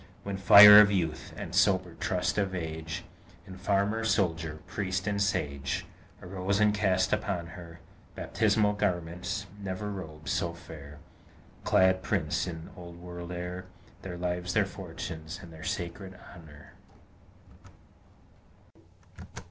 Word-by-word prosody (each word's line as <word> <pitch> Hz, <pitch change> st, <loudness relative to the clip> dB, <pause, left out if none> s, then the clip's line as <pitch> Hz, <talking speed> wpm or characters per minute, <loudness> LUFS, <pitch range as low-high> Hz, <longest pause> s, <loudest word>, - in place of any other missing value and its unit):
When 100 Hz, -1 st, -4 dB
fire 105 Hz, +2 st, +10 dB
of 105 Hz, -1 st, +7 dB
Youth, 85 Hz, -6 st, -2 dB
and -, -, -7 dB
sober 95 Hz, -3 st, +2 dB
trust 90 Hz, +2 st, -1 dB
of 95 Hz, -2 st, -1 dB
Age, 80 Hz, -1 st, -5 dB, 0.4 s
In 95 Hz, -2 st, -10 dB
Farmer, 100 Hz, +4 st, 0 dB
Soldier, 85 Hz, -8 st, 0 dB
Priest, 95 Hz, -2 st, -3 dB
and 100 Hz, -1 st, -1 dB
Sage, 70 Hz, -8 st, -1 dB, 0.4 s
Arose 95 Hz, +2 st, -2 dB
and 105 Hz, -1 st, +4 dB
cast 95 Hz, -3 st, +1 dB
upon 85 Hz, -1 st, -1 dB
her 85 Hz, -1 st, -11 dB, 0.4 s
Baptismal 105 Hz, -1 st, +1 dB
garments, 90 Hz, +1 st, -2 dB, 0.2 s
never 100 Hz, +2 st, -4 dB
robes 80 Hz, -5 st, -7 dB
so 85 Hz, -1 st, -1 dB
fair 75 Hz, -3 st, -11 dB, 0.7 s
Clad 95 Hz, 0 st, +3 dB
prince 85 Hz, -5 st, -1 dB
in 80 Hz, -2 st, -7 dB
Old 85 Hz, -1 st, -10 dB
World 85 Hz, 0 st, -8 dB
air, 90 Hz, +1 st, -5 dB, 0.3 s
Their 90 Hz, -2 st, -7 dB
lives, 90 Hz, 0 st, -2 dB
their 105 Hz, -, +4 dB
fortunes, 85 Hz, -3 st, -7 dB
and 85 Hz, -4 st, -12 dB
their 80 Hz, -, -12 dB
sacred 95 Hz, +1 st, -5 dB, 0.2 s
honor! 75 Hz, -4 st, -14 dB
90 Hz, 125 wpm, -29 LUFS, 85-100 Hz, 0.7 s, fire